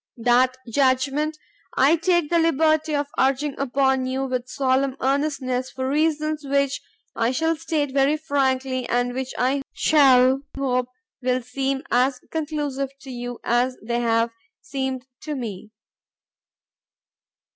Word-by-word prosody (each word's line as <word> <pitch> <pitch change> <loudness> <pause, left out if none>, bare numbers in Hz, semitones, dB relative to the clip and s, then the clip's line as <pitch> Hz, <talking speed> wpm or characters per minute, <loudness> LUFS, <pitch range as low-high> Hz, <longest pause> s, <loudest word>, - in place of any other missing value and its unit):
That 245 +2 +3
judgment, 275 +5 +1 0.4
I 280 +5 +5
take 345 -1 +1
the 340 - +4
liberty 315 -1 +2
of 290 0 0
urging 275 +2 +2
upon 265 -1 +1
you 265 +1 -1
with 255 -1 -3
solemn 265 0 +1
earnestness 265 -2 0
for 260 0 -4
reasons 305 +1 0
which 280 0 0 0.3
I 230 0 +1
shall 320 +6 +1
state 300 -3 -2
very 280 +2 +3
frankly 265 -4 0
and 245 0 +1
which 260 0 -4
I 265 +3 +1
shall 265 -3 +5 0.2
hope 250 -2 0 0.3
will 255 0 0
seem 270 +2 -2
as 250 +1 +2
conclusive 295 -4 -2
to 270 - -9
you 245 -1 -6
as 250 +2 +1
they 235 +2 -1
have 230 0 +1 0.3
seemed 265 - -3 0.2
to 305 -1 -4
me. 215 -5 -6
265 Hz, 130 wpm, -23 LUFS, 255-290 Hz, 0.4 s, I